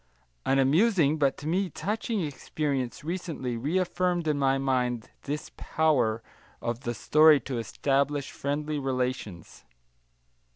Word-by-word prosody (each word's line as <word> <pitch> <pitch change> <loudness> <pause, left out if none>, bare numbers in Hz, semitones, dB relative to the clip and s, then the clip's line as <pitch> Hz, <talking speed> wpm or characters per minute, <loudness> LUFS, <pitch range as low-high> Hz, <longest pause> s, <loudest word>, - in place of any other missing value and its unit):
An 135 - +3
amusing, 155 - +3
but 140 -3 +2
to 145 - -7
me 185 +3 +1
touching 210 +6 -2
experience 140 -3 -3
recently 160 -7 -3
reaffirmed 175 +5 0
in 150 -2 +1
my 135 -1 +3
mind 125 -4 -1
this 145 +2 -4
power 130 -8 +1 0.4
of 120 0 -3
the 120 -2 -4
story 155 +5 +6
to 130 -4 -4
establish 140 +5 0
friendly 150 +1 -2
relations. 125 -9 -3
140 Hz, 120 wpm, -28 LUFS, 130-160 Hz, 0.4 s, story